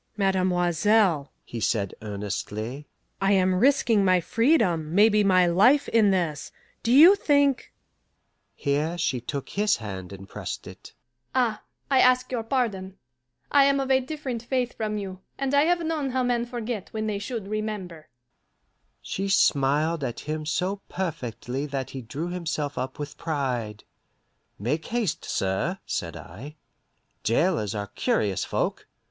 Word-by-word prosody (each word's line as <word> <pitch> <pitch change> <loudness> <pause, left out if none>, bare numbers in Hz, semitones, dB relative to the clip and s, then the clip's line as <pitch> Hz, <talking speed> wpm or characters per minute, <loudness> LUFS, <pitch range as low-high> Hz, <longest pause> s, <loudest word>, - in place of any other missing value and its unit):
"Mademoiselle," 185 -3 +2
he 120 - -6
said 105 -3 0
earnestly, 105 +5 -5 0.3
"I 195 +1 +3
am 185 -1 +3
risking 230 0 +3
my 185 -1 +4
freedom, 180 - +1
maybe 210 +1 +5
my 185 -2 +5
life, 210 +12 +4
in 220 -3 +4
this; 170 -6 -1 0.3
do 230 - 0
you 315 +9 +9
think 285 -6 +2 0.4
" - - -48
Here 150 +4 -1
she 130 -7 -1
took 140 +3 -5
his 210 +1 +2
hand 95 -5 -7
and 95 0 -10
pressed - - -6
it. - - -12 0.4
"Ah, 235 -5 +1 0.3
I 265 - +5
ask 255 0 +4
your 245 -3 -1
pardon. 220 -6 -2 0.5
I 280 -1 +6
am 275 0 +3
of 270 0 -1
a 260 - +5
different 265 -3 -5
faith 245 0 -1
from 215 -1 -2
you, 190 -2 -6 0.2
and 275 0 -2
I 285 +1 +5
have 340 0 +1
known 310 -4 -1
how 260 0 0
men 240 -1 0
forget 235 -4 -4
when 220 0 -3
they 210 -2 -2
should 215 -1 -5
remember." 205 -7 -5 0.9
She 195 +1 -3
smiled 150 -2 +2
at 120 -3 -4
him 155 0 -4
so 185 +5 -1
perfectly 140 - -4
that 135 -2 -4
he 135 - -6
drew 145 +9 -5
himself 160 -5 -3
up 130 +1 -4
with 145 -1 -7
pride. 125 -9 -3 0.7
"Make 140 +10 -2
haste, 225 -8 -1
sir," 95 0 -1
said - - -3
I. 145 +7 -10 0.7
"Jailers 115 - +1
are 105 -1 -2
curious 100 -1 0
folk." - - -2
185 Hz, 150 wpm, -26 LUFS, 140-230 Hz, 0.9 s, you